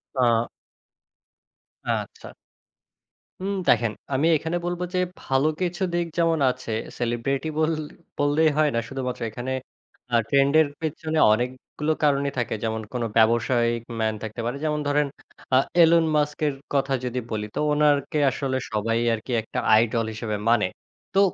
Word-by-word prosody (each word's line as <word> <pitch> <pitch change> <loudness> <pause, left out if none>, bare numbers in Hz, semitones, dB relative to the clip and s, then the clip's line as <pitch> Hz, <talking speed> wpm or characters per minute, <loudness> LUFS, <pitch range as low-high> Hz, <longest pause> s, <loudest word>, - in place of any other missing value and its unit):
আ 120 -2 +2 1.4
আচ্ছা। - - -3 1.1
হুম, 200 +1 -1
দেখেন 115 -1 +4 0.2
আমি 140 +5 +2
এখানে 160 +3 -2
বলব 175 0 -3
যে - - +2 0.2
ভালো 135 +2 +1
কিছু 180 0 -1
দিক 175 0 +1
যেমন 165 -1 +2
আছে, 125 -2 -8 0.3
সেলিব্রিটি 120 +5 -1
বল 155 +1 +2 0.5
বললেই 145 +2 +3
হয় 155 -1 +4
না 115 - +2
শুধুমাত্র 130 -2 -4
এখানে, 120 +4 -5 0.6
আ - - +5
ট্রেন্ড 140 0 +3
এর 155 - +2
পেছনে 160 0 -3 0.2
অনেকগুলো 130 +6 -2
কারণই 140 -1 +2
থাকে। 120 -2 -1
যেমন 110 0 -1
কোন 125 - -1
ব্যবসায়িক 115 +1 +3 0.2
ম্যান 110 0 +1
থাকতে 110 +2 -5
পারে। 125 +3 -2
যেমন 150 0 0
ধরেন 145 0 +2 0.5
আ - - +7 0.2
Elon 165 0 +6
Musk 150 0 0
এর 145 - -1 0.2
কথা 135 -1 +1
যদি 125 0 -2
বলি। 105 -1 -2
তো - - -1
উনারকে 150 0 +2
আসলে 130 0 -2
সবাই 115 +2 0
আরকি 115 +3 -5
একটা 110 - -4 0.2
আইডল 115 +1 +2
হিসেবে 110 -1 -3
মানে। 115 -5 +4 0.5
তো 195 - +3
135 Hz, 145 wpm, -24 LUFS, 115-150 Hz, 1.4 s, আ